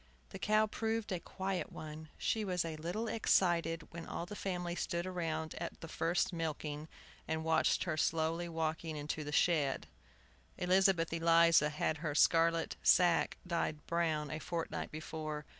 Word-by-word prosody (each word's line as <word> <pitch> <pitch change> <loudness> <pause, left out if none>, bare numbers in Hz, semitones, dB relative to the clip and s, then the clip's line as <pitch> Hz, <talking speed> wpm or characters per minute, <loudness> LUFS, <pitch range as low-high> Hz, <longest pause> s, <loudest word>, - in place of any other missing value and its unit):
The - - -8
cow 215 +1 +3
proved 220 0 -2
a 180 - -1
quiet 190 +2 -3
one. 155 0 -8
She 220 - 0
was 180 -4 0
a 160 -1 -4
little 175 +9 -3
excited 170 -7 +1
when 170 0 -7
all 170 - -4
the 205 +4 -8
family 180 -3 -3
stood 175 0 -2
round 165 -4 -3
at - - -5
the 165 - -8
first 175 +3 0
milking, 155 -2 -3 0.4
and 160 0 -1
watched 160 0 +2
her 170 -4 -2
slowly 165 +2 0
walking 160 -1 -2
into 150 +1 -3
the 150 - -5
shed. 150 -4 +2 0.7
Elizabeth 180 -2 +3
Eliza 165 -2 +5
had 155 +1 -1
her 150 -1 -3
scarlet 165 +1 +3
sack 175 -2 +4
dyed 165 -3 -2
brown 160 -3 0
a 155 - -3
fortnight 165 0 -3
before. 155 -1 -5
165 Hz, 155 wpm, -34 LUFS, 155-175 Hz, 0.7 s, Eliza